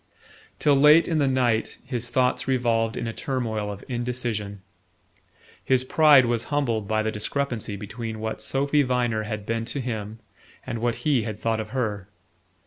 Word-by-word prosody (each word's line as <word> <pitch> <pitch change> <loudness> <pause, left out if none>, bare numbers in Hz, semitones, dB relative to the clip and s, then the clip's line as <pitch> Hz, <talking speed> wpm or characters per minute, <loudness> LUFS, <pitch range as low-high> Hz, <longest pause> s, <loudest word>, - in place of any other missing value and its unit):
Till 145 -2 +3
late 150 +4 +6
in 160 -2 +1
the 140 - +2
night 125 -4 +1
his 120 -2 -3
thoughts 130 0 +1
revolved 115 -4 +1
in - - -3
a 115 - -3
turmoil 110 -6 -2
of 100 0 -9
indecision. 120 -5 -3 1.0
His 130 -1 +2
pride 145 -1 +6
was 120 -1 -1
humbled 120 -8 -1
by 110 0 +1
the 110 - -1
discrepancy 110 0 -2
between 110 +2 -6
what 110 0 -4
Sophy 140 +2 +1
Viner 125 -4 0
had 105 -1 -5
been 115 +1 -1
to 125 +4 -2
him 110 -4 -4 0.5
and 115 - -4
what 120 0 0
he 145 -6 +3
had 110 -1 -5
thought 115 -1 0
of 110 0 -5
her. 105 -6 -3
120 Hz, 165 wpm, -25 LUFS, 110-130 Hz, 1.0 s, late